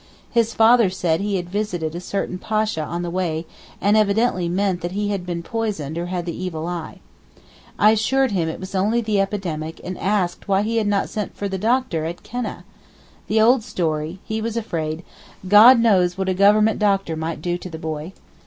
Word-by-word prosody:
His 230 -1 +1
father 225 -2 +5
said 180 -2 0
he 205 0 -1
had 175 -2 -3
visited 180 -5 -3
a 170 - -4
certain 185 0 -3
Pasha 215 -6 -1
on 170 +3 -4
the 175 - -4
way 170 -3 -2 0.3
and 205 +2 +3
evidently 210 -3 +2
meant 185 0 0
that 175 +1 -4
he 205 +1 -1
had 195 -3 -3
been 170 -1 -3
poisoned 200 -9 -3
or 170 +1 -3
had 175 -1 -3
the 170 - -4
evil 170 -4 -4
eye. 175 -2 -6 0.8
I 210 - +6
assured 260 +4 +2
him 170 -5 0
it 160 - -6
was 190 +1 -8
only 210 +5 +1
the 215 -3 +1
epidemic 170 -6 -3
and 185 0 -6
asked 190 -3 -1
why 195 0 +2
he 230 +2 -1
had 215 -2 +1
not 205 -1 +1
sent 210 -1 -5
for 205 - -2
the 190 -1 -4
doctor 225 -7 0
at 170 +2 -6
Keneh. 245 0 -5 0.6
The 220 - +2
old 240 +3 +5
story! 160 -2 -2
He 220 0 -3
was 230 +1 -3
afraid, 165 -7 -3 0.4
'God 225 +6 +8
knows 185 -6 +3
what 190 0 -1
a - - +2
government 210 +3 +4
doctor 195 -5 +1
might 160 0 -4
do 175 +3 -2
to 180 - -8
the 160 - -7
boy. 160 +2 -5
190 Hz, 200 wpm, -21 LUFS, 170-215 Hz, 0.8 s, God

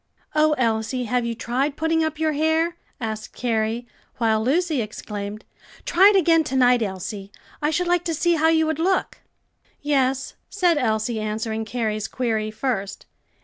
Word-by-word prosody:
"Oh, 305 0 +4
Elsie, 235 -1 0
have 245 0 0
you 230 - -3
tried 265 +6 -1
putting 320 0 +1
up 315 -1 -2
your 315 0 +1
hair?" 320 +3 +1 0.2
asked 220 -2 -5
Carrie; 230 0 -1 0.3
while 220 -2 +2
Lucy 310 +2 +1
exclaimed, 210 -1 -6 0.4
"Try 380 +4 +6
it 415 - +2
again 330 -3 +4
to 270 - -3
night, 250 -2 +4
Elsie, 195 0 -4 0.3
I 300 - +2
should 345 +3 0
like 350 0 +2
to 330 -2 -1
see 345 +3 +2
how 320 -1 +3
you 320 0 +3
would 315 -1 -2
look." 375 +3 0 0.6
"Yes," 270 -2 0 0.2
said 355 -6 +2
Elsie, 220 -2 0
answering 220 +1 -3
Carrie's 215 -2 -2
query 220 -4 -1
first. 215 -4 -3
250 Hz, 160 wpm, -23 LUFS, 220-320 Hz, 0.6 s, Try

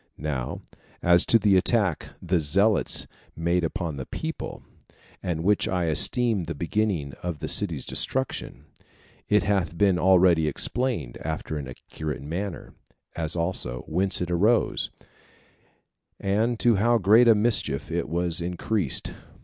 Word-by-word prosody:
Now 70 -5 -4 0.4
as 85 0 +4
to 115 - +6
the 105 -3 +3
attack 95 -3 +1
the 90 0 +1
zealots 100 +8 +3 0.3
made 85 +2 0
upon 80 -2 -3
the 65 - -6
people, - - -6 0.6
and 80 -3 -3
which 105 +2 +2
I 90 -1 -1
esteem 105 +5 +2
the - - -5
beginning 85 -4 -1
of 85 -3 -4
the - - -5
city's - - +1
destruction, 130 - -2 0.6
it 105 -2 +3
hath 95 -4 -1
been 95 -2 +3
already 90 -3 +4
explained 115 - -1
after 80 0 -4
an 70 -3 -5
accurate 75 +3 -7
manner; 90 +6 -5 0.4
as 80 -1 -3
also 85 -8 -2
whence 95 0 -1
it 90 0 -2
arose, 105 +7 +1 1.3
and 110 +4 0
to 115 -4 +3
how 120 +4 +3
great 110 +4 +5
a 115 - +7
mischief 105 - 0
it - - -2
was 85 +1 +1
increased. 90 -1 -1
90 Hz, 135 wpm, -25 LUFS, 80-105 Hz, 1.3 s, a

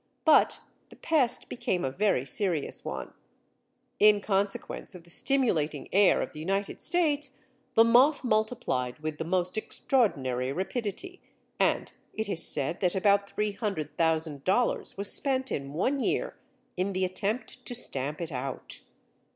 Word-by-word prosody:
But 315 -2 +5 0.3
the - - -14
pest 290 -7 +1
became 180 -6 -2
a 130 - -1
very 190 -5 +1
serious 165 +1 -1
one. - - -5 0.9
In 210 0 +6
consequence 195 -1 -2
of 175 - -11
the 170 - -15
stimulating 225 - +1
air 200 0 +5
of - - -7
the 150 - -8
United 195 +5 -2
States 295 -6 +1 0.4
the 225 - +8
moth 255 +6 +5
multiplied 215 - 0
with 155 0 -5
the - - -1
most 180 +4 0
extraordinary 135 - 0
rapidity, 230 - -4 0.4
and - - +1 0.2
it 220 -1 -1
is 170 -4 +1
said 140 +5 0
that 180 -1 +1
about 200 +1 +3
300,000 160 - -1
dollars 235 +3 +1
was 200 +1 +1
spent 265 -2 0
in 140 -1 -3
one 255 - 0
year - - -1 0.4
in 190 +2 -1
the 185 0 +1
attempt 215 +7 -3
to 245 - -3
stamp 145 - -3
it 165 -1 -4
out. 130 0 -5
195 Hz, 145 wpm, -28 LUFS, 160-240 Hz, 0.9 s, the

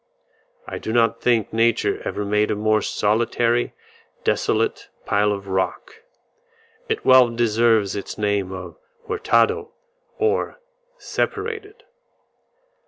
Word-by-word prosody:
I - - -5
do 110 - -4
not 115 0 +2
think 115 -3 +1
Nature 115 0 +1
ever 105 - -3
made 105 +1 +1
a - - 0
more 110 +1 +2
solitary, 115 +4 0 0.5
desolate - - 0 0.2
pile 105 0 +2
of 100 -1 -4
rock; 95 - -3 0.9
it 445 - -2
well 130 -2 +7
deserves 115 -3 +2
its 100 - -6
name 100 -3 0
of 95 - -8 0.3
Hurtado, 440 +1 +1 0.4
or 440 +3 0 0.4
separated. 425 -2 -4
115 Hz, 105 wpm, -22 LUFS, 105-130 Hz, 0.9 s, well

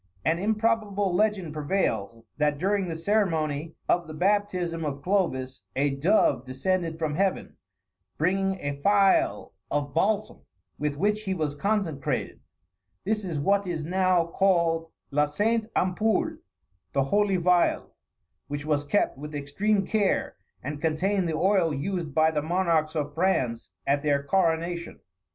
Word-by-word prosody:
An 165 +1 +2
improbable 210 -2 0
legend 195 -5 +1
prevails, 115 - -1
that 150 -1 +2
during 195 +3 0
the 165 - -3
ceremony 165 -5 0
of 175 -1 +1
the 155 - -8
baptism 180 -2 0
of 140 -2 -4
Clovis, 135 - 0
a 140 +1 +2
dove 140 - +2
descended 165 +5 -1
from 155 -2 -2
Heaven, 190 +4 -1 0.6
bringing 190 +3 +1
a 145 0 -4
phial 195 - +3 0.2
of 145 -1 -2
balsam, 210 +5 0 0.4
with 150 -1 -1
which 210 +5 +1
he 190 -1 -1
was 155 -4 -1
consecrated. 170 -5 -2 0.6
This 215 +1 -1
is 170 -5 -3
what 200 +6 +1
is 160 -4 -3
now 185 0 +2
called 170 -2 +1 0.2
La 150 +1 +3
Sainte 215 +9 0
Ampoule, 220 - +1 0.6
the 135 - +2
Holy 200 +6 +2
Phial; 175 0 +2 0.6
which 145 0 -5
was 150 -2 +1
kept 145 -2 0
with 150 +1 -7
extreme 195 +9 0
care, 210 -4 0 0.3
and 145 +2 -5
contained 175 +3 0
the 155 - -1
oil 185 -2 +3
used 165 +2 -3
by 160 0 +4
the 150 -2 -1
monarchs 165 -1 +1
of 145 -1 -2
France 145 -9 0 0.2
at 140 +1 +2
their 140 -2 +1
coronation. 170 +1 0
170 Hz, 140 wpm, -26 LUFS, 150-195 Hz, 0.6 s, by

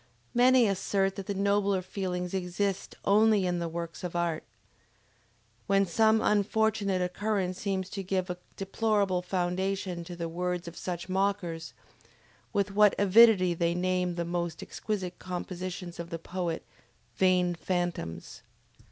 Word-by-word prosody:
Many 250 0 +6
assert 195 -1 0
that 195 -2 -6
the 200 - -2
nobler 200 -1 +1
feelings 180 -2 -3
exist 190 +1 -2
only 210 -1 +4
in 175 -1 0
the 170 -1 -2
works 170 +1 -6
of 180 -1 -4
art. 170 -2 0 1.2
When 195 0 +4
some 220 +5 +3
unfortunate 205 -2 +1
occurrence 185 0 -1
seems 190 -2 -1
to 195 - -4
give 185 -1 -1
a 180 -1 -5 0.2
deplorable 200 -2 0
foundation 180 0 -2
to 175 0 -7
the 170 -1 -3
words 180 +1 -3
of 170 - -8
such 175 0 -5
mockers, 185 -4 -1 0.8
with 200 0 0
what 210 0 +5
avidity 200 -2 +6
they 170 0 0
name 180 0 0
the 170 0 -2
most 170 -1 -3
exquisite 190 -4 -4
conceptions 180 -1 -5
of 170 0 -5
the 165 - -4
poet, 170 0 -4 0.5
"vain 180 -1 +3
phantoms!" 175 - -3
185 Hz, 135 wpm, -29 LUFS, 175-200 Hz, 1.2 s, Many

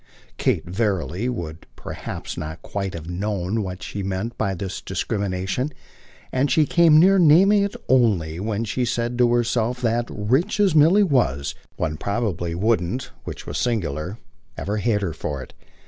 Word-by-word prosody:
Kate, - - +1
verily, 95 - -1
would 85 -9 -6
perhaps - - -6
not 80 +2 -6
quite 100 -3 -4
have 80 -1 -7
known 100 +3 -2
what 95 -1 -5
she 100 - -5
meant 95 +5 -3
by 100 -3 -1
this 95 +1 -5
discrimination, 100 +6 -2 0.6
and 130 +2 +1
she 155 - +4
came 165 -1 +5
near 190 +3 +6
naming 185 +6 +6
it 200 0 -1
only 95 -11 +2
when 105 +2 -2
she 125 +4 -1
said 120 0 -1
to 120 -1 +3
herself 120 0 +1
that, 120 -1 0
rich 130 - 0
as 200 -5 +4
Milly 165 +7 +6
was, 120 - +1 0.2
one 75 -1 -2
probably 95 -5 -2
wouldn't 105 +3 0
which - - -7
was 75 0 -3
singular 90 - -2 0.4
ever 105 +2 -2
hate 105 -1 +1
her 85 -5 -2
for 70 -3 -4
it. - - -15
105 Hz, 160 wpm, -23 LUFS, 90-125 Hz, 0.6 s, near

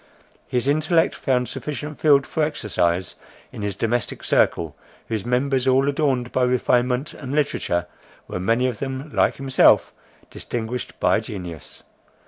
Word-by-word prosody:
His 125 +1 -1
intellect 155 +3 +2
found 125 -2 0
sufficient 150 0 -5
field 140 -3 +5
for 160 - -2
exercise 95 - 0 0.4
in - - -8
his 100 -2 -2
domestic 115 +2 -1
circle, 80 -4 +1 0.3
whose 110 -1 -3
members, 130 +1 +1
all 130 +1 +4
adorned 135 -4 0
by 130 - 0
refinement 125 +2 +1
and 135 0 -6
literature, 90 - 0 0.4
were - - -4
many 115 +7 +1
of 125 -4 -2
them, 135 +2 -5
like - - +2
himself, 135 -1 +4 0.4
distinguished 120 +1 -5
by - - +3
genius. 90 -6 -8
125 Hz, 135 wpm, -22 LUFS, 110-140 Hz, 0.4 s, field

